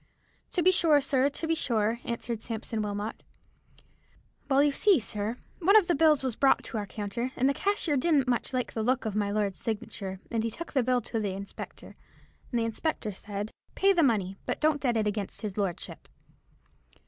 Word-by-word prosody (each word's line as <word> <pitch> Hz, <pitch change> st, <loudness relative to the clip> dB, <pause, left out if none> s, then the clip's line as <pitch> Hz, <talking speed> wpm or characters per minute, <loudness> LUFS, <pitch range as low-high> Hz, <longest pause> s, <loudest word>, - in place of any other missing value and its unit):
"To 350 Hz, -, +2 dB
be 370 Hz, -, +7 dB
sure, 325 Hz, -5 st, +4 dB
sir, 275 Hz, 0 st, +2 dB
to 290 Hz, -, -5 dB
be 325 Hz, -, +1 dB
sure," 230 Hz, -6 st, 0 dB
answered 235 Hz, -1 st, -3 dB
Sampson 225 Hz, -1 st, -3 dB
Wilmot. 205 Hz, +1 st, -3 dB, 1.3 s
"Well, 275 Hz, +1 st, +5 dB
you 290 Hz, -, +4 dB
see, 380 Hz, +3 st, +4 dB
sir, 215 Hz, +1 st, -3 dB, 0.2 s
one 385 Hz, +4 st, +4 dB
of 425 Hz, -4 st, +8 dB
the 350 Hz, -, +2 dB
bills 305 Hz, -2 st, +4 dB
was 255 Hz, -4 st, -1 dB
brought 270 Hz, +2 st, +3 dB
to 225 Hz, -, -4 dB
our 205 Hz, -, -4 dB
counter, 225 Hz, +5 st, -3 dB
and 260 Hz, -, +2 dB
the 280 Hz, -, +3 dB
cashier 390 Hz, -4 st, 0 dB
didn't 280 Hz, -2 st, +3 dB
much 245 Hz, -2 st, 0 dB
like 255 Hz, -1 st, -2 dB
the 225 Hz, -, -2 dB
look 250 Hz, +3 st, +1 dB
of 215 Hz, -2 st, -2 dB
my 205 Hz, -1 st, +1 dB
lord's 205 Hz, -2 st, -1 dB
signature, 200 Hz, -3 st, -4 dB
and 225 Hz, -2 st, 0 dB
he 230 Hz, -, 0 dB
took 335 Hz, +9 st, -8 dB
the 270 Hz, -, +3 dB
bill 250 Hz, 0 st, +2 dB
to 225 Hz, +1 st, -3 dB
the 205 Hz, -3 st, -1 dB
inspector, 195 Hz, +1 st, -8 dB, 0.6 s
and 240 Hz, -, +1 dB
the 230 Hz, -, +1 dB
inspector 230 Hz, 0 st, -2 dB
said,' 205 Hz, +2 st, -5 dB, 0.2 s
Pay 395 Hz, +1 st, +4 dB
the 350 Hz, -, +3 dB
money, 200 Hz, -, +1 dB
but -, -, -1 dB
don't 305 Hz, -1 st, +2 dB
debit 235 Hz, -5 st, +1 dB
it -, -, +1 dB
against 205 Hz, +1 st, -3 dB
his 205 Hz, -3 st, -3 dB
lordship.' 195 Hz, -5 st, -3 dB
235 Hz, 200 wpm, -29 LUFS, 210-285 Hz, 1.3 s, of